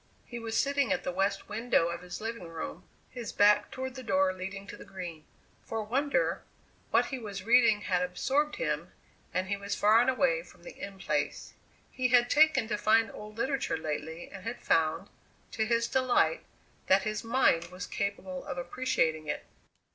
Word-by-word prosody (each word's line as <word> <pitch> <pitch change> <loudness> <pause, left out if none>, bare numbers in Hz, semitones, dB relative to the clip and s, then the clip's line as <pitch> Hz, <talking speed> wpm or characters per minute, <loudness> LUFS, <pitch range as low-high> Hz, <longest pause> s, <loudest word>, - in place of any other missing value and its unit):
He 240 - -7
was 225 -1 -3
sitting 280 -5 +2
at 180 -1 0
the - - -2
west 195 +2 -1
window 215 -5 +1
of 170 0 -5
his 180 -1 -7
living 225 -4 -5
room, 165 +2 -6 0.3
his 240 -3 -6
back 205 0 +4
toward 260 0 -5
the 260 - -7
door 190 -5 +2
leading 195 +2 -6
to - - -9
the - - -11
Green. 175 -5 -8 0.4
For 225 - -5
a 220 - -1
wonder, 280 - 0 0.5
what - - +4
he 265 - -5
was 200 -4 -6
reading 230 -2 +5
had 180 -1 0
absorbed 270 +12 0
him, - - -2 0.4
and 185 0 0
he 200 - 0
was 200 0 -3
far 215 +3 +5
and 245 - +3
away - - +2
from - - -18
the - - -10
In 200 -1 -8
Place. 150 -5 -2 0.4
He 255 -1 0
had 245 -1 +4
taken 310 -6 +5
to 210 - -1
fine, 225 +2 +3
old 210 +1 -10
literature 265 - 0
lately 160 +1 -4
and 195 -2 -9
had 230 +2 -5
found, 165 +3 +2 0.4
to 220 -1 -1
his 230 0 +2
delight, 260 - +2 0.4
that 190 +1 +5
his 215 0 -2
mind 230 -8 +3
was 180 +1 -7
capable 190 -2 -3
of - - -5
appreciating 170 -6 0
it. - - -3
210 Hz, 185 wpm, -30 LUFS, 185-245 Hz, 0.5 s, reading